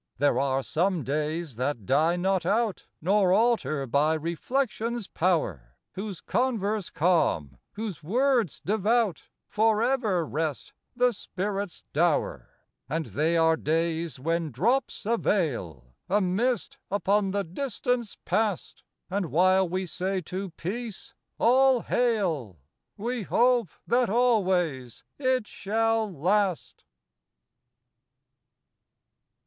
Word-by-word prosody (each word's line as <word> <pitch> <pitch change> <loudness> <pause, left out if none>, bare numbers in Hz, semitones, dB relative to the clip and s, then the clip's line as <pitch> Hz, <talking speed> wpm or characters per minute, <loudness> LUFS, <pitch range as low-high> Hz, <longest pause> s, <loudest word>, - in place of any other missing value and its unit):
There 145 +2 +2
are 135 -1 0
some 175 +1 0
days 150 0 -2
that 125 -4 -2
die 155 - +3
not 185 0 +1
out, 215 +3 0 0.2
Nor 190 +1 +3
alter 215 - +2
by 145 +5 +2
reflection's 230 - -2
power, 155 - -1 0.2
Whose 195 -2 -6
converse 215 -4 -1
calm, 145 - +1
whose 210 -7 -5
words 240 - +1
devout, 215 0 +1 0.2
For 220 0 +2
evef 220 - +1
rest, 155 -2 -3 0.2
the 245 0 +3
spirit's 200 -1 -4
dower. 160 +1 +1 0.4
And 160 +2 -1
they 160 +7 +2
are 160 0 +4
days 165 -2 -1
when 165 +3 -1
drops 225 - 0
a 230 +2 +2
veil 85 - -1
— - - -53
A 205 +3 +3
mist 240 +8 -1
upon 200 +1 +1
the 200 +1 -1
distance 240 +3 -2
past; 215 -4 -1 0.3
And 195 -1 -2
while 185 +4 +3
we 185 +2 -2
say 185 +3 -2
to 185 +3 -5
peace 220 +4 -5
— - - -56
" - - -53
All 260 +1 +4
hail! 180 - 0 0.2
" - - -55
We 240 +3 -2
hope 240 0 +2 0.2
that 245 -1 +2
always 185 - +1 0.2
it 255 -4 +1
shall 225 +2 0
last. 185 +3 0
190 Hz, 120 wpm, -27 LUFS, 160-225 Hz, 0.4 s, are